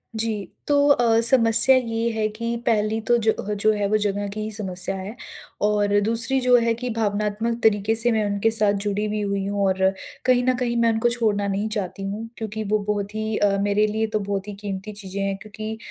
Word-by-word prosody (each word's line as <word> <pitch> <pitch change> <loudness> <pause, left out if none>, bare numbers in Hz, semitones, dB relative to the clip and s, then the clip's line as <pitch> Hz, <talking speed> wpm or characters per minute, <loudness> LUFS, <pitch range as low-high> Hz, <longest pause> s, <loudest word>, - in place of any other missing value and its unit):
जी। 220 -3 -2 0.2
तो 290 - +3
अ, 235 -5 +4
समस्या 235 +2 +5
ये 230 -2 0
है 220 -1 0
कि 230 +2 -3
पहली 215 0 +1
तो 240 - +4
जो 220 - +4 0.2
ह 210 - -1
जो 215 - +5
है 205 -1 -1
वो 215 - +3
जगह 205 -1 -1
की 215 - -6
ही 215 +1 -4
समस्या 195 -2 -3
है 195 +4 -6 0.5
और 205 -1 +2
दूसरी 230 +5 +1
जो 250 0 +5
है 230 -1 +2
कि 245 +2 -4
भावनात्मक 210 +2 -1
तरीके 215 0 +3
से 235 +2 +1
मैं 220 -2 +1
उनके 205 +2 +1
साथ 210 -2 +2
जुड़ी 205 +1 -1
भी 210 0 -2
हुई 200 -1 -1
हूँ 200 0 0
और 190 0 0 0.4
कहीं 250 -1 +4
न 255 - +2
कहीं 240 -1 -1
मैं 235 0 +3
उनको 225 +2 +2
छोड़ना 215 -4 0
नहीं 200 +2 -1
चाहती 200 -3 -4
हूँ 215 +3 -5
क्योंकि 220 -1 -4
वो 215 +1 +1
बहुत 205 +1 -5
ही 220 0 -2
अ, 200 -1 +2
मेरे 205 +1 +2
लिए 220 +1 -1
तो 215 0 -1
बहुत 200 -1 -3
ही 205 - -5
कीमती 200 0 -5
चीज़ें 200 -1 -6
हैं 195 0 -1
क्योंकि 215 +1 -6
215 Hz, 220 wpm, -23 LUFS, 205-225 Hz, 0.5 s, समस्या